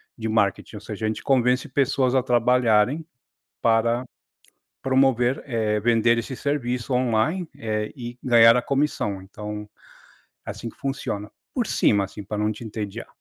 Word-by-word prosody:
de 110 Hz, -1 st, -4 dB
marketing, 105 Hz, 0 st, 0 dB
ou 105 Hz, -, -6 dB
seja, 110 Hz, 0 st, -5 dB
a -, -, +2 dB
gente 110 Hz, -, -3 dB
convence 125 Hz, -1 st, +2 dB
pessoas 135 Hz, -1 st, +1 dB
a 130 Hz, -, +4 dB
trabalharem 125 Hz, +2 st, +2 dB, 0.6 s
para 115 Hz, +2 st, +2 dB, 0.8 s
promover, 130 Hz, -1 st, +2 dB
eh, 110 Hz, -4 st, 0 dB
vender 115 Hz, +1 st, +3 dB
esse 125 Hz, +3 st, -4 dB
serviço 125 Hz, -3 st, -2 dB
online, 130 Hz, +9 st, +1 dB
eh, 105 Hz, -1 st, -2 dB
e 120 Hz, -1 st, -7 dB
ganhar 115 Hz, -1 st, +6 dB
a -, -, +1 dB
comissão. 135 Hz, -8 st, -1 dB
Então, 105 Hz, +2 st, -7 dB, 0.8 s
assim 115 Hz, -, -6 dB
que -, -, -24 dB
funciona, 120 Hz, -7 st, -4 dB, 0.2 s
por 245 Hz, -4 st, 0 dB
cima, 100 Hz, -, +2 dB
assim, 100 Hz, +1 st, -9 dB
pra 105 Hz, +1 st, -4 dB
não 105 Hz, +1 st, +1 dB
te 110 Hz, +2 st, -7 dB
entediar. 105 Hz, -2 st, -6 dB
115 Hz, 150 wpm, -24 LUFS, 105-130 Hz, 0.8 s, ganhar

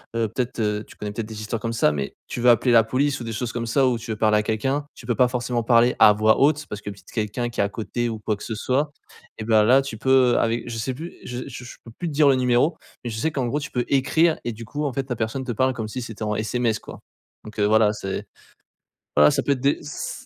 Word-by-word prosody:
heu, 115 Hz, -1 st, +1 dB
peut-être, 120 Hz, +3 st, -3 dB
heu, 105 Hz, -1 st, 0 dB
tu -, -, -15 dB
connais 105 Hz, -1 st, -5 dB
peut-être 110 Hz, +1 st, -5 dB
des 110 Hz, -1 st, -8 dB
histoires 110 Hz, 0 st, -4 dB
comme 115 Hz, -, -2 dB
ça 115 Hz, -, +3 dB
mais 70 Hz, -2 st, -4 dB
tu 120 Hz, -, -5 dB
veux 125 Hz, -, +5 dB
appeler 120 Hz, +1 st, +4 dB
la 115 Hz, -1 st, +7 dB
police 140 Hz, +5 st, 0 dB
ou -, -, -6 dB
des 115 Hz, -, -5 dB
choses 120 Hz, +2 st, -3 dB
comme 115 Hz, -1 st, -3 dB
ça, 135 Hz, +4 st, +3 dB
ou 120 Hz, -2 st, 0 dB
tu 115 Hz, -, -10 dB
veux 110 Hz, -, -3 dB
parler 105 Hz, 0 st, +3 dB
à -, -, -1 dB
quelqu'un, 135 Hz, +7 st, -1 dB
tu -, -, -13 dB
peux 120 Hz, -, 0 dB
pas 125 Hz, +2 st, +4 dB
forcément 125 Hz, -1 st, -2 dB
parler 120 Hz, +1 st, +4 dB
à 105 Hz, -, +8 dB
voix 110 Hz, +1 st, +3 dB
haute 150 Hz, +2 st, +3 dB
parce 105 Hz, -, -7 dB
que 105 Hz, -, -6 dB
peut-être 100 Hz, -1 st, -12 dB
quelqu'un 110 Hz, +2 st, -2 dB
qui 120 Hz, -, -8 dB
est -, -, +4 dB
à 100 Hz, -, 0 dB
côté 120 Hz, +2 st, -3 dB
ou 110 Hz, -, -4 dB
quoi 110 Hz, -, +1 dB
que -, -, -11 dB
ce 110 Hz, -, -4 dB
soit 135 Hz, +7 st, 0 dB, 0.5 s
et 110 Hz, -, -5 dB
bah, 110 Hz, -1 st, +4 dB
là, 130 Hz, +5 st, +5 dB
tu 135 Hz, -5 st, -6 dB
peux 130 Hz, -1 st, +4 dB
avec 115 Hz, 0 st, 0 dB
je 120 Hz, -, -5 dB
sais 125 Hz, +4 st, -2 dB
plus 165 Hz, +6 st, -8 dB
je 125 Hz, 0 st, -5 dB
je 125 Hz, -2 st, -9 dB
peux 115 Hz, -, -11 dB
plus 175 Hz, -, -2 dB
te 160 Hz, -, -4 dB
dire 145 Hz, 0 st, +4 dB
le 135 Hz, -, +5 dB
numéro 125 Hz, +5 st, +2 dB, 0.3 s
mais 120 Hz, -, -4 dB
je 110 Hz, -, -5 dB
sais 160 Hz, -, +1 dB
qu'en 135 Hz, -4 st, -1 dB
gros 135 Hz, +5 st, -1 dB
tu 145 Hz, -, -6 dB
peux 125 Hz, -1 st, -1 dB
écrire 160 Hz, +5 st, +2 dB
et 120 Hz, -, -1 dB
du 115 Hz, +1 st, -9 dB
coup 145 Hz, +7 st, -4 dB
en 140 Hz, -, -1 dB
fait 135 Hz, +1 st, -3 dB
la 125 Hz, -, -1 dB
personne 115 Hz, +4 st, -3 dB
te 125 Hz, -, -3 dB
parle 130 Hz, +3 st, +1 dB
comme 110 Hz, -3 st, -4 dB
si 125 Hz, +4 st, -5 dB
c'était 115 Hz, -2 st, -7 dB
en 105 Hz, 0 st, -1 dB
SMS 115 Hz, +1 st, 0 dB
quoi. -, -, -11 dB, 0.4 s
Donc, 110 Hz, 0 st, -10 dB
heu, 105 Hz, -, +3 dB
voilà 110 Hz, 0 st, +4 dB
c'est 95 Hz, -2 st, -5 dB, 0.9 s
voilà 75 Hz, 0 st, +6 dB
ça -, -, 0 dB
peut 140 Hz, -, +2 dB
être 130 Hz, -, -6 dB
des 140 Hz, +1 st, +2 dB
ç 150 Hz, 0 st, -6 dB
120 Hz, 290 wpm, -23 LUFS, 110-130 Hz, 0.9 s, à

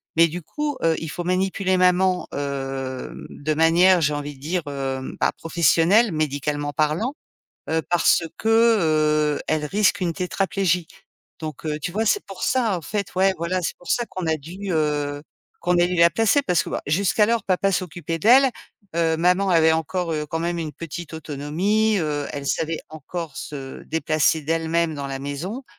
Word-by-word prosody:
Mais 165 Hz, +1 st, +6 dB
du 175 Hz, +3 st, -6 dB
coup, 295 Hz, -, -3 dB
heu, 165 Hz, -1 st, +3 dB
il 160 Hz, -, -5 dB
faut 175 Hz, -, -5 dB
manipuler 185 Hz, +1 st, 0 dB
maman, 180 Hz, 0 st, +3 dB
hem, 135 Hz, -2 st, -4 dB
de 155 Hz, +2 st, -3 dB
manière, 170 Hz, +3 st, +5 dB
j'ai 150 Hz, -1 st, +2 dB
envie 145 Hz, 0 st, -5 dB
de -, -, -19 dB
dire, 170 Hz, +4 st, -2 dB
heu, 135 Hz, -2 st, -4 dB
bah, -, -, +2 dB
professionnelle, 170 Hz, +7 st, +3 dB
médicalement 145 Hz, -1 st, -2 dB
parlant, 155 Hz, -, 0 dB, 0.6 s
heu, 160 Hz, +1 st, +1 dB
parce 175 Hz, -1 st, +3 dB
que, -, -, -4 dB, 0.9 s
heu, -, -, -5 dB
elle 155 Hz, -1 st, 0 dB
risque 200 Hz, +4 st, +2 dB
une 170 Hz, -2 st, 0 dB
tétraplégie. 180 Hz, -1 st, 0 dB, 0.5 s
Donc 155 Hz, -2 st, -7 dB
heu, 150 Hz, -1 st, -2 dB
tu 180 Hz, -, -3 dB
vois, 220 Hz, +5 st, -1 dB
c'est 410 Hz, -, +2 dB
pour 195 Hz, -1 st, -8 dB
ça, 240 Hz, -6 st, +1 dB
en -, -, -7 dB
fait, 200 Hz, +4 st, -4 dB
ouais, 190 Hz, +1 st, +3 dB
voilà, 170 Hz, +3 st, -1 dB
c'est 170 Hz, -, -2 dB
pour 175 Hz, -, -13 dB
ça 240 Hz, -, +1 dB
qu'on 185 Hz, -2 st, -5 dB
a 160 Hz, 0 st, +1 dB
dû, 185 Hz, +7 st, -7 dB
heu, 145 Hz, -2 st, -1 dB, 0.4 s
qu'on 175 Hz, +1 st, +2 dB
a 175 Hz, -, +5 dB
dû 180 Hz, -, -2 dB
la 170 Hz, 0 st, +6 dB
placer. 225 Hz, -, +2 dB
Parce 180 Hz, -9 st, +2 dB
que, -, -, -7 dB
ben, -, -, -2 dB
jusqu'alors, 210 Hz, +7 st, +2 dB
papa 195 Hz, +1 st, +1 dB
s'occupait 170 Hz, -3 st, -3 dB
d'elle. 260 Hz, -, +6 dB, 0.5 s
Heu, 165 Hz, -1 st, +2 dB
maman 180 Hz, +4 st, +2 dB
avait 160 Hz, -2 st, +5 dB
encore, 165 Hz, +2 st, -2 dB
heu, 150 Hz, -1 st, -2 dB
quand 165 Hz, -, -3 dB
même 170 Hz, +1 st, -1 dB
une 155 Hz, -2 st, -4 dB
petite 170 Hz, 0 st, -7 dB
autonomie, 160 Hz, +9 st, 0 dB
heu, 150 Hz, -3 st, -2 dB
elle 140 Hz, -1 st, -6 dB
savait 160 Hz, +2 st, -1 dB
encore 155 Hz, 0 st, -7 dB
se 135 Hz, -3 st, -7 dB
déplacer 155 Hz, 0 st, +1 dB
d'elle-même 165 Hz, +1 st, 0 dB
dans 140 Hz, -1 st, -4 dB
la 135 Hz, 0 st, -4 dB
maison. 160 Hz, -, -5 dB
165 Hz, 180 wpm, -23 LUFS, 150-185 Hz, 0.9 s, Mais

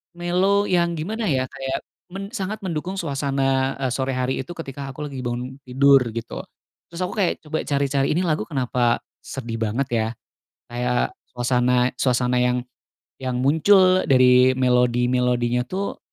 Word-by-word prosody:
Mellow 180 Hz, +4 st, +2 dB
yang 170 Hz, -1 st, +2 dB
gimana, 215 Hz, +8 st, -3 dB
ya, 130 Hz, -4 st, +1 dB
kayak 135 Hz, -1 st, -4 dB, 0.3 s
men 195 Hz, +1 st, -6 dB
sangat 215 Hz, -2 st, -4 dB
mendukung 180 Hz, +1 st, -3 dB
suasana, 135 Hz, -4 st, 0 dB
eee, 130 Hz, -, 0 dB
sore 130 Hz, +1 st, -1 dB
hari 130 Hz, +1 st, -1 dB
itu 175 Hz, -, -9 dB
ketika 140 Hz, -3 st, -6 dB
aku 150 Hz, +3 st, -6 dB
lagi 135 Hz, -, -6 dB
bangun 125 Hz, +2 st, -4 dB
tidur, 135 Hz, +2 st, +5 dB, 0.2 s
gitu. 115 Hz, -, -5 dB, 0.5 s
Terus 170 Hz, +1 st, -6 dB
aku 180 Hz, -, -3 dB
kayak 185 Hz, -4 st, 0 dB
coba 155 Hz, 0 st, -3 dB
cari-cari 140 Hz, -1 st, +1 dB
ini 175 Hz, -, +2 dB
lagu 155 Hz, -9 st, 0 dB
kenapa 125 Hz, -3 st, 0 dB, 0.2 s
sedih 120 Hz, -4 st, -6 dB
banget, 115 Hz, +5 st, 0 dB
ya, 110 Hz, -1 st, +1 dB, 0.6 s
kayak 125 Hz, 0 st, 0 dB, 0.2 s
suasana 125 Hz, 0 st, +2 dB
suasana 125 Hz, -1 st, +2 dB
yang 125 Hz, 0 st, +1 dB, 0.5 s
yang 130 Hz, -2 st, -3 dB
muncul 185 Hz, +6 st, +4 dB
dari 130 Hz, -1 st, +5 dB
melodi-melodinya, 125 Hz, -1 st, +2 dB
tuh, 195 Hz, +8 st, -4 dB
135 Hz, 145 wpm, -22 LUFS, 125-165 Hz, 0.6 s, tidur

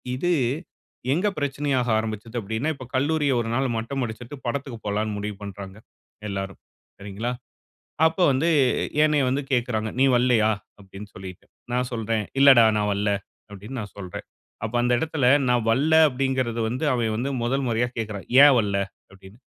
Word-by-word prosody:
இது 175 Hz, +7 st, 0 dB, 0.8 s
எங்க 180 Hz, +7 st, +1 dB
பிரச்சனையாக 140 Hz, -3 st, -1 dB
ஆரம்பிச்சுது 110 Hz, +2 st, -4 dB
அப்படின்னா, 110 Hz, +8 st, -2 dB
இப்ப 130 Hz, -, -10 dB
கல்லூரியை 145 Hz, +1 st, +1 dB
1 115 Hz, -, -4 dB
நாள் 135 Hz, +2 st, +1 dB
மட்டம் 115 Hz, +5 st, -3 dB
அடிச்சுட்டு 115 Hz, +4 st, -8 dB
படத்துக்கு 130 Hz, 0 st, -3 dB
போலாம்னு 105 Hz, +1 st, -1 dB
முடிவு 105 Hz, 0 st, -4 dB
பண்றாங்க 100 Hz, -1 st, -8 dB, 0.5 s
எல்லோரும், 95 Hz, -1 st, -5 dB, 0.4 s
சரிங்களா? 105 Hz, +5 st, -4 dB, 0.8 s
அப்போ 160 Hz, +3 st, 0 dB
வந்து 135 Hz, +6 st, +1 dB, 0.6 s
என்னைய 150 Hz, -2 st, +3 dB
வந்து 135 Hz, +3 st, 0 dB
கேட்கிறாங்க, 115 Hz, -3 st, 0 dB
"நீ -, -, +6 dB
வரல்லையா?" 120 Hz, -3 st, +3 dB, 0.3 s
அப்படின்னு 100 Hz, +1 st, -11 dB
சொல்லிட்டு. 95 Hz, -1 st, -10 dB, 0.3 s
நான் 125 Hz, 0 st, 0 dB
சொல்றேன், 115 Hz, -1 st, -1 dB, 0.2 s
"இல்லைடா 135 Hz, -4 st, +8 dB
நான் 105 Hz, 0 st, 0 dB
வரல." 100 Hz, +1 st, 0 dB, 0.4 s
அப்படின்னு 105 Hz, +6 st, -8 dB
நான் 105 Hz, -2 st, -8 dB
சொல்றேன். 90 Hz, -3 st, -7 dB, 0.4 s
அப்போ 115 Hz, +2 st, -3 dB
அந்த 120 Hz, 0 st, +2 dB
இடத்தில, 155 Hz, -5 st, +1 dB, 0.2 s
"நான் 120 Hz, -2 st, +2 dB
வரல" 145 Hz, +7 st, +2 dB, 0.2 s
அப்படிங்கிறது 130 Hz, -3 st, -1 dB
வந்து 130 Hz, +6 st, -3 dB
அவன் 115 Hz, -3 st, 0 dB
வந்து 130 Hz, +5 st, -2 dB
முதல் 135 Hz, +3 st, 0 dB
முறையா 120 Hz, +1 st, +1 dB
கேட்கிறான், 105 Hz, -3 st, -5 dB, 0.2 s
"ஏன் 145 Hz, -2 st, +7 dB
வரல?' 100 Hz, -3 st, 0 dB, 0.3 s
அப்படின்னு. 95 Hz, +3 st, -16 dB
120 Hz, 150 wpm, -24 LUFS, 105-135 Hz, 0.8 s, இல்லைடா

